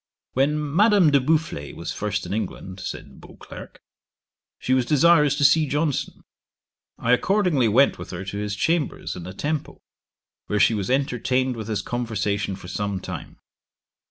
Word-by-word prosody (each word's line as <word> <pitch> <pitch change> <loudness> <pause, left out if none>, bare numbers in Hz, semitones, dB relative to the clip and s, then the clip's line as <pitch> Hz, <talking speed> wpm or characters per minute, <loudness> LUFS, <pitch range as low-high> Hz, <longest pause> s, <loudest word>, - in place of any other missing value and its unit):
'When 140 +3 +2 0.2
Madame 205 -5 +5
de 140 - +5
Boufflers 150 - -1
was - - -5
first - - -3
in - - -4
England, 95 -3 -5
(said - - -8
Beauclerk,) - - -12 0.8
she 130 - -1
was 130 -1 +3
desirous 150 +1 +4
to 145 - -1
see 155 +1 +5
Johnson. 145 0 -2 0.7
I 120 - 0
accordingly 175 - +2
went 130 +6 +3
with - - -8
her 100 - -6
to 95 +2 -5
his 105 -1 -3
chambers 160 +8 -1
in 90 - -7
the 95 - -7
Temple, 150 +5 -3 0.7
where 105 - 0
she 100 - +5
was 100 -1 -2
entertained 130 -1 0
with 110 -2 -6
his 105 -3 -2
conversation 105 -5 -2
for 95 - -11
some 100 +1 -3
time. - - -8
130 Hz, 155 wpm, -23 LUFS, 105-150 Hz, 0.8 s, Madame